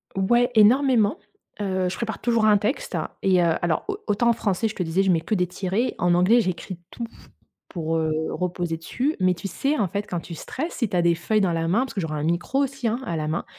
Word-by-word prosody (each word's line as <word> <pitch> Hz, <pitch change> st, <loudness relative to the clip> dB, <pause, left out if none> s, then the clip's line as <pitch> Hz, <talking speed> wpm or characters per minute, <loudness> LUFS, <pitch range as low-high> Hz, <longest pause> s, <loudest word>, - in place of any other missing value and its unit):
Ouais, 240 Hz, +6 st, +3 dB
énormément. 230 Hz, 0 st, +4 dB, 0.4 s
Heu, 190 Hz, -2 st, 0 dB
je 180 Hz, -, -4 dB
prépare 220 Hz, -3 st, -4 dB
toujours 230 Hz, -2 st, +2 dB
un 210 Hz, -1 st, +6 dB
texte 215 Hz, +7 st, -2 dB, 0.3 s
et 185 Hz, -2 st, +4 dB
heu, 165 Hz, -1 st, +3 dB
alors, 170 Hz, -2 st, 0 dB
au 405 Hz, -1 st, -2 dB
autant 215 Hz, +3 st, +2 dB
en -, -, +5 dB
français, 220 Hz, -1 st, 0 dB
je 215 Hz, -, -6 dB
te 180 Hz, -, -1 dB
disais, 175 Hz, +4 st, +1 dB
je 190 Hz, -, +3 dB
mets 165 Hz, -2 st, +2 dB
que 215 Hz, -, -1 dB
des 180 Hz, -1 st, +1 dB
tirets. 190 Hz, +6 st, -2 dB
En 175 Hz, 0 st, +2 dB
anglais, 185 Hz, +7 st, +5 dB
j'écris 185 Hz, -1 st, -4 dB
tout 235 Hz, -, -5 dB, 0.6 s
pour, 165 Hz, -2 st, -2 dB
heu, 160 Hz, -1 st, 0 dB, 0.2 s
reposer 175 Hz, -2 st, -2 dB
dessus. 255 Hz, -, -2 dB
Mais 185 Hz, 0 st, +3 dB
tu 190 Hz, +3 st, -6 dB
sais, 280 Hz, -, -1 dB
en 200 Hz, -, +1 dB
fait, 200 Hz, +4 st, -3 dB
quand 175 Hz, -4 st, -4 dB
tu 165 Hz, 0 st, -9 dB
stresses, 310 Hz, -, -5 dB
si 235 Hz, -6 st, -1 dB
tu -, -, -3 dB
a -, -, +4 dB
des 170 Hz, 0 st, +3 dB
feuilles 215 Hz, +5 st, 0 dB
dans 175 Hz, -3 st, +1 dB
la 165 Hz, 0 st, -1 dB
main, 195 Hz, +8 st, +2 dB
parce 265 Hz, -, -4 dB
que 195 Hz, -, -2 dB
j'aurai 155 Hz, -2 st, -3 dB
un -, -, -3 dB
micro 170 Hz, -, 0 dB
aussi, 270 Hz, -3 st, -3 dB
hein, 235 Hz, +3 st, 0 dB
à 170 Hz, -, -3 dB
la 155 Hz, 0 st, -2 dB
main 160 Hz, +2 st, -2 dB
190 Hz, 250 wpm, -24 LUFS, 175-230 Hz, 0.6 s, un